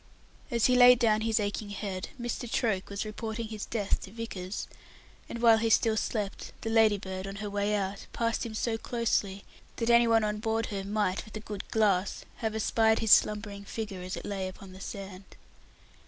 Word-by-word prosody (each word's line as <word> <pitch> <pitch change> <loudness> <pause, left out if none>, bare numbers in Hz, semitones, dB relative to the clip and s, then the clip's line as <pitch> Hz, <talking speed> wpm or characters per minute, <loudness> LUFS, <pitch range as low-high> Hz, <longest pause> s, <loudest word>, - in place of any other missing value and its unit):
As 235 -4 +2
he 250 - +4
laid 250 0 +8
down 220 -2 +3
his 225 0 +1
aching 205 0 -2
head, 195 -2 -4
Mr. 240 0 -4
Troke 205 -6 0
was 200 +1 -3
reporting 220 +1 -5
his 215 -2 -6
death 210 -4 -1
to 190 - -9
Vickers, 210 -4 -5 0.6
and 235 - -5
while 225 -1 +7
he 225 0 +1
still 225 0 +4
slept, 210 -2 -3
the 225 - -3
Ladybird, 200 -4 +2
on 195 - -6
her 205 0 -5
way 205 +1 0
out, 195 -1 -3
passed 230 0 -1
him 225 -2 -5
so 225 0 -1
closely 210 -5 -1 0.3
that 235 0 +1
any 235 0 +6
one 225 -1 +4
on 210 0 -1
board 225 0 0
her 195 -1 -3
might, 205 -1 -1
with 215 0 -9
a - - -5
good 210 -2 -7
glass, 200 -4 +1
have 220 -1 -2
espied 220 0 +3
his 220 -2 +1
slumbering 205 -1 +4
figure 200 -2 -5
as 185 +1 -5
it - - -7
lay 195 -2 -3
upon 185 0 -10
the 190 - -12
sand. 195 -1 -7
215 Hz, 195 wpm, -29 LUFS, 200-225 Hz, 0.6 s, laid